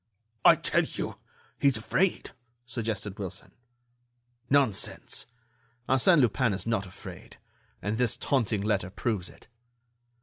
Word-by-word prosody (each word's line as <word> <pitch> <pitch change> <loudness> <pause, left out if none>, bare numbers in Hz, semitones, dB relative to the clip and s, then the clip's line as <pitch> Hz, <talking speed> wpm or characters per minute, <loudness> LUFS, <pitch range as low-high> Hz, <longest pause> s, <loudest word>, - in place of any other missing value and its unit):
"I - - +9
tell - - +2
you—he's 140 -4 -3
afraid," 170 +11 0 0.3
suggested 110 -5 -4
Wilson. 95 -4 -6 1.0
"Nonsense! 135 -7 +1 0.6
Arsène 140 +5 +5
Lupin 120 -1 +2
is 95 - -4
not 115 -4 0
afraid, 90 - -11 0.5
and 105 +3 -1
this 125 -3 +2
taunting 115 -7 +1
letter 100 -3 0
proves 100 -2 -2
it." - - -18
110 Hz, 105 wpm, -28 LUFS, 100-130 Hz, 1.0 s, I